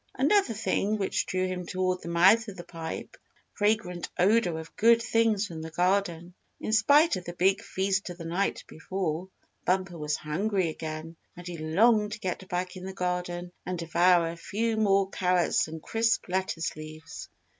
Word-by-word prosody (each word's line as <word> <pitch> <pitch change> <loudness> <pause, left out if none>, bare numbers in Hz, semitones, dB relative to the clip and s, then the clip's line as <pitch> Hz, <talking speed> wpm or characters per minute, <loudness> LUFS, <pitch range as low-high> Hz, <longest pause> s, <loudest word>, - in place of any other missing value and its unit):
Another 280 - +3
thing 215 0 0
which 195 -2 -1
drew 185 0 0
him 185 -1 -3
toward 185 0 -1
the - - -9
mouth 190 +7 +5
of 200 -3 -8
the 175 - -7
pipe 165 -2 -6
was - - -19
the - - -43 0.2
fragrant 205 -5 0
odor 185 -3 +3
of 160 0 -9
good 230 +1 +5
things 225 -3 +2
from 165 -5 -7
the 160 - -6
garden. 175 0 0 0.3
In 215 - -3
spite 285 - +5
of 180 - -8
the 175 - -6
big 190 +3 +2
feast 195 -2 -1
of 175 - -7
the 165 - -8
night 180 +4 -1
before, 180 0 -4 0.3
Bumper 185 -2 0
was 150 0 -1
hungry 185 +4 -1
again, 160 +1 -6 0.2
and 175 - -10
he 175 -2 -6
longed 210 +7 +3
to 225 - -6
get 185 0 -4
back 180 0 -2
in 185 0 -8
the 190 - -6
garden 180 -1 -3
and 180 0 -3
devour 170 0 +3
a - - -8
few 225 +6 -1
more 195 -3 +3
carrots 180 -3 +1
and 160 0 -8
crisp 225 0 +1
lettuce 185 -3 -2
leaves. 155 +1 -9
185 Hz, 185 wpm, -28 LUFS, 170-205 Hz, 0.3 s, mouth